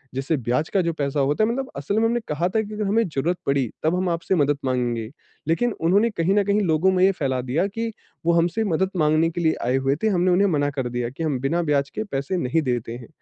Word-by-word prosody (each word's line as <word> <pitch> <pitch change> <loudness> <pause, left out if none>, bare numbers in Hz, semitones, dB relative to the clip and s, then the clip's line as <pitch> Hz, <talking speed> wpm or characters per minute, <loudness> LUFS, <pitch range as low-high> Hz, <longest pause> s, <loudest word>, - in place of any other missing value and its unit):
जिससे 135 +4 0
ब्याज 125 +5 -1
का 195 - +2
जो 170 -1 -1
पैसा 145 -1 -2
होता 145 +9 +2
है 220 - +2
मतलब 265 +2 -2
असल 150 +9 -2
में 225 - +2
हमने 235 +1 +1
कहा 150 +4 0
था 220 +3 +1
कि 215 0 -7
अगर 210 0 -2
हमें 225 +2 +2
जरुरत 165 +5 -1
पड़ी 140 -3 +2 0.2
तब 160 +3 +2
हम 180 0 0
आपसे 170 +2 0
मदद 145 -3 +2
माँगेंगे, 120 -3 -1 0.4
लेकिन 235 +10 +1
उन्होंने 200 +8 +3
कहीं 175 0 0
न 205 - +4
कहीं 205 +1 +2
लोगों 170 +1 +2
में 185 0 +2
ये 195 - +5
फैला 130 -6 -1
दिया 130 +9 0
कि 225 +3 -4 0.4
वो 170 - +5
हमसे 170 +6 +1
मदद 185 0 +1
माँगने 155 +1 +3
के 175 - -4
लिए 160 -1 +2
आए 125 +2 +2
हुए 135 +1 +1
थे - - +3
हमने 185 -2 +2
उन्हें 195 +3 +4
मना 145 -5 +1
कर 135 -3 -3
दिया 120 -1 -2
कि 135 +6 -6
हम 145 -5 -1
बिना 165 +6 0
ब्याज 140 0 +1
के 215 - -1
पैसे 140 +7 -2
नहीं 160 +2 0
देते 120 -3 -2
हैं। 120 - -12
165 Hz, 260 wpm, -23 LUFS, 135-190 Hz, 0.4 s, ये